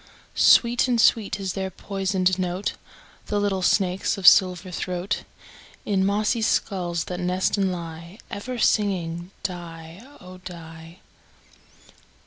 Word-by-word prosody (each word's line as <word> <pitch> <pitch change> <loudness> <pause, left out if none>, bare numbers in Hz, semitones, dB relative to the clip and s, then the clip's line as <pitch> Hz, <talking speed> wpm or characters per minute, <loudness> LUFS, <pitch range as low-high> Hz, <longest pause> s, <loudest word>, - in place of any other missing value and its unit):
Sweet 240 +2 +5
and 245 -2 +1
sweet 220 -2 +3
is 190 -2 -3
their 190 -1 -3
poisoned 190 -1 -1
note, 180 +2 -2 0.5
The 205 - 0
little 200 -2 0
snakes' 185 0 +1
of 195 - -6
silver 180 0 +5
throat, 180 +2 -3 0.6
In 195 -2 +1
mossy 210 +4 +1
skulls 175 -6 0
that 180 -1 -6
nest 180 +1 0
and 195 -2 +1
lie, 170 +1 -8
Ever 245 +5 -5
singing 180 -6 0
"die, 170 -1 -7 0.2
oh! 185 0 -12
die." 165 0 -11
185 Hz, 120 wpm, -24 LUFS, 175-200 Hz, 0.6 s, Sweet